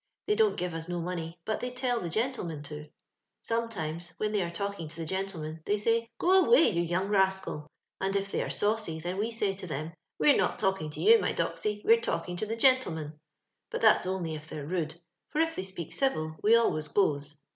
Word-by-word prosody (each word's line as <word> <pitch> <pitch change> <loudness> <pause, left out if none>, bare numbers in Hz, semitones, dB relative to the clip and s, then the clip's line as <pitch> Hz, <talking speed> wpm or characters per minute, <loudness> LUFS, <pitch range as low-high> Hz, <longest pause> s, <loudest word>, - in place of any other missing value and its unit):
They 420 - +2
don't 430 -1 +3
give 180 -1 -2
us 165 +1 -5
no 175 0 -2
money, 170 -1 -4
but 220 - -1
they 250 - -3
tell 250 -1 -1
the 175 - -4
gentlemi'U 180 - -2
to. 150 0 -8 0.6
SometinK^ 175 -8 -2
when 215 0 -1
they 210 -2 +1
are 170 - -1
talking 200 -1 -4
to 155 - -10
the 165 0 -5
genUemeu« 165 -4 -4
they 205 - +1
say, 230 +2 +1
* - - -55
Go 375 +1 +5
awajt 465 -5 +5
you 170 - +1
young 175 +3 0
rascal 190 -3 +2
1 150 - -13 0.2
* - - -27
and 195 - -1
if 195 0 -1
they - - -1
ftre - - -2
saucy, 210 -6 0
then 175 +3 -4
we 220 +2 0
say 210 -4 -1
to 190 -1 -8
them, 155 +1 -4
* - - -58
We 295 - +5
re - - +4
not - - +1
talking 190 -6 0
to 150 - -9
you, 455 +2 +7
my - - 0
doxy, 210 -1 -2
wete 230 +1 +6
talking 180 -5 -2
to 215 - -2
the 225 - -2
gentle 255 -3 +4
man,'^— 155 -1 -5 0.6
but - - -4
that's - - +5
only 185 -4 -2
if 155 0 -7
they're 150 -2 -6
rude, 165 -1 -3 0.3
for 300 - -2
if 325 0 +2
they - - -2
speak 185 -4 -6
dvil 155 - 0
we 220 +3 +6
always 155 -10 +2
goes. 145 -5 0
190 Hz, 235 wpm, -29 LUFS, 160-225 Hz, 0.6 s, you